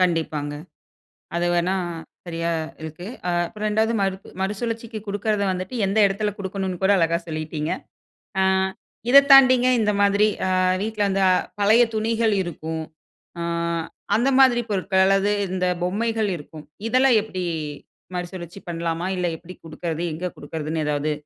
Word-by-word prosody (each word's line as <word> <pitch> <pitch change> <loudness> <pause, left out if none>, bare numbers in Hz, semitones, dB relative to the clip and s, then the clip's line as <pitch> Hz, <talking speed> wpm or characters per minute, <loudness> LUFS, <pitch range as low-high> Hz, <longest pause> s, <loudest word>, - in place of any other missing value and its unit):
கண்டிப்பாங்க, 160 -5 0 0.8
அது 170 0 +1
வேணா 175 +2 +1 0.5
சரியா 170 -1 -2 0.3
இருக்கு. 160 +3 -7 0.2
அ - - +1 0.2
அப்புறம் 215 +3 -4
2வது 220 +2 +1
மறு 195 -1 +1 0.3
மறுசுழற்சிக்கு 225 +3 -3
குடுக்குறத 205 +1 0
வந்துட்டு 185 +5 -4
எந்த 195 +2 -1
இடத்தில 205 +2 -1
குடுக்கணும்னு 190 -2 -4
கூட 190 - +5
அழகா 165 -1 +2
சொல்லீட்டிங்க. 155 0 -3 0.7
அ - - +4 0.7
இத 275 +3 +10
தாண்டிங்க 255 -2 +8
இந்த 210 -1 +2
மாதிரி 200 +1 +4 0.6
வீட்டில 215 -1 0
அந்த 195 0 +1
அ - - +5 0.3
பழைய 220 +4 +6
துணிகள் 225 0 +1
இருக்கும். 160 -1 -5 0.6
ஆ - - -3 0.7
அந்த 240 +5 +3
மாதிரி 255 -3 +6
பொருட்கள் 190 -1 +2
அல்லது 195 +1 +3 0.2
இந்த 185 -1 0 0.2
பொம்மைகள் 220 +3 0
இருக்கும், 150 +1 -11 0.2
இதெல்லாம் 255 0 +4
எப்டி 185 -4 -5 0.7
மறுசுழற்சி 175 0 -6
பண்ணலாமா? 165 0 -2
இல்ல 180 - 0
எப்டி 175 +2 -11
குடுக்கறது? 165 +1 -4
எங்க 165 +4 -5
குடுக்குறதுன்னு? 155 +1 -4
எதாவது 150 +1 0
190 Hz, 135 wpm, -23 LUFS, 170-215 Hz, 0.8 s, இத